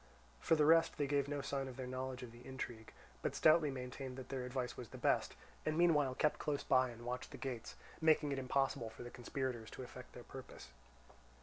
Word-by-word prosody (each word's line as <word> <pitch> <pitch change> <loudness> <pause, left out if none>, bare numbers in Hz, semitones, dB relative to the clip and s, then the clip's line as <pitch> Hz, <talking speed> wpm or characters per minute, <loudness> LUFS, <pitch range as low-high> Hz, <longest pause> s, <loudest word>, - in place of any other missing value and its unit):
For 165 - +4
the 150 -1 +4
rest, 165 +1 +5
they 145 - +2
gave 140 0 +1
no 145 0 -2
signs 135 -1 -2
of 125 - -9
their 130 - -3
knowledge 130 0 -4
of 120 - -7
the 120 +1 -13
intrigue, 120 -4 -6 0.3
but - - -1
stoutly 155 -1 +6
maintained 130 0 -5
that 130 -1 -7
their 130 -2 -2
advice 125 -1 -2
was 120 -4 -7
the - - -9
best, - - +2 0.3
and 155 0 0
meanwhile 150 -7 +4
kept 150 - +2
close 145 -2 -1
by 130 -1 +4
and 120 0 -10
watched 125 +1 -3
the - - -8
gates, 125 -4 -5 0.3
making 155 -2 +4
it 135 - 0
impossible 130 -3 +1
for 110 - -9
the 120 - -8
conspirators 125 -2 -3
to - - -7
effect 125 0 -10
their 120 - -9
purpose. 130 +2 -10
130 Hz, 215 wpm, -38 LUFS, 125-145 Hz, 0.3 s, stoutly